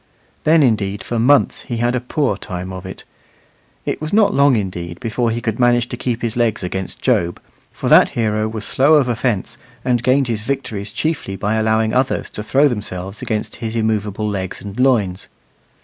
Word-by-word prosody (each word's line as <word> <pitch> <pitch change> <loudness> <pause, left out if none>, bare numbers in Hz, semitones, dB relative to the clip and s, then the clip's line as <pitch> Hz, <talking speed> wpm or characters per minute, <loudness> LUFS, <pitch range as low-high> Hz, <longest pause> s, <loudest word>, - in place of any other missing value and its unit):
Then 155 0 +5
indeed 105 -5 0
for 120 +3 -2
months 140 +5 +3
he 120 -3 -5
had 120 +1 +1
a 125 - +1
poor 125 -1 -1
time 95 -1 -6
of 95 0 -7
it; 95 - -9 0.8
it - - -2
was 155 0 -4
not 205 -1 +4
long 140 -2 +4
indeed 90 -5 -4
before 120 0 -1
he 115 +1 -2
could 110 0 -2
manage 120 -1 +3
to - - -4
keep 120 -2 -3
his 115 -2 -2
legs 115 -5 0
against 95 +1 -5
Job, 85 0 +1 0.3
for - - -5
that - - +7
hero 110 -1 +1
was 110 -1 -4
slow 145 +4 +4
of 140 -4 +4
offence, 120 -4 -1 0.3
and 125 -2 +2
gained 130 +3 +3
his 115 -3 -1
victories 110 -5 -3
chiefly 110 -3 -2
by 105 +3 -1
allowing 110 0 +1
others 130 +1 0
to - - -6
throw 135 +7 +3
themselves 100 -5 -5
against 110 -2 -3
his 115 -1 -4
immovable 105 -2 -1
legs 95 -3 -3
and 100 +3 -8
loins. 110 -9 +1
110 Hz, 190 wpm, -19 LUFS, 100-125 Hz, 0.8 s, that